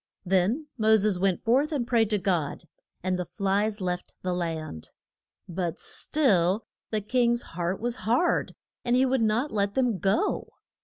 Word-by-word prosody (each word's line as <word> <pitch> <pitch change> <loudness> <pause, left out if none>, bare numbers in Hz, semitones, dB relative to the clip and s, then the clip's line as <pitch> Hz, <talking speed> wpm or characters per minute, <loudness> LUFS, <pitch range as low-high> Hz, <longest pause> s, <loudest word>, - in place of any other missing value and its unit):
Then 195 - +1
Mo 220 0 +5
ses 205 -3 +1
went 190 -2 +1
forth 270 +7 +2
and 275 -6 -1
prayed 230 -4 +2
to 210 - +2
God, 175 -6 -1 0.4
and 185 0 0
the - - 0
flies 205 +3 0
left 180 -1 -3
the 180 -1 -1
land. 160 - -4 0.6
But 175 -1 -3
still 205 - +2 0.2
the 215 -1 -1
king's 240 +2 +1
heart 175 +2 -2
was 240 +1 -2
hard, 235 - +1 0.3
and 240 0 +2
he 260 +1 +4
would 260 -1 +1
not 225 +6 +1
let 200 -1 0
them 245 -7 +1
go. 205 - 0
210 Hz, 160 wpm, -27 LUFS, 180-240 Hz, 0.6 s, Mo